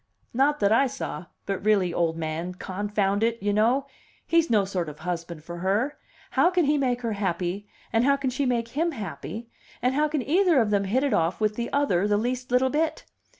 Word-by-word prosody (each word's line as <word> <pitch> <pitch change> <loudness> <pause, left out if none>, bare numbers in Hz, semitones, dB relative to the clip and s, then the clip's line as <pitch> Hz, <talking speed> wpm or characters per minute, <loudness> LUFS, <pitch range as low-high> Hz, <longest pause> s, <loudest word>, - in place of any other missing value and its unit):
"Not 280 +4 +2
that 200 0 +3
I 270 +5 +5
saw. 250 -8 -6 0.2
But 195 -1 -3
really, 200 -5 +2
old 165 -1 0
man, 165 +3 -3
confound 200 +1 -1
it, 230 0 +1
you 205 +1 0
know! 240 +6 +2 0.4
He's 335 -1 +2
no 210 -4 +3
sort 180 -4 -2
of 150 +1 -11
husband 170 -2 -4
for 170 +1 -7
her. 210 +11 0 0.3
How 345 - +4
can 360 -3 +2
he 295 +2 +3
make 250 -4 0
her 230 -2 -1
happy 190 0 -2 0.3
and 225 +1 +3
how 280 +2 +4
can 270 -2 -1
she 265 +2 -1
make 235 -2 0
him 325 +7 -1
happy, 225 - -7 0.3
and 250 +2 +1
how 300 +2 +2
can 300 -3 -1
either 340 - +3
of 220 -3 +1
them 200 -1 +2
hit 245 +8 +1
it 285 - +1
off 165 +2 +1
with 215 -1 +1
the 235 +1 -3
other 210 -10 +2
the 205 0 +2
least 250 +3 -2
little 255 +1 +3
bit? 315 +1 -1
225 Hz, 215 wpm, -26 LUFS, 190-270 Hz, 0.4 s, I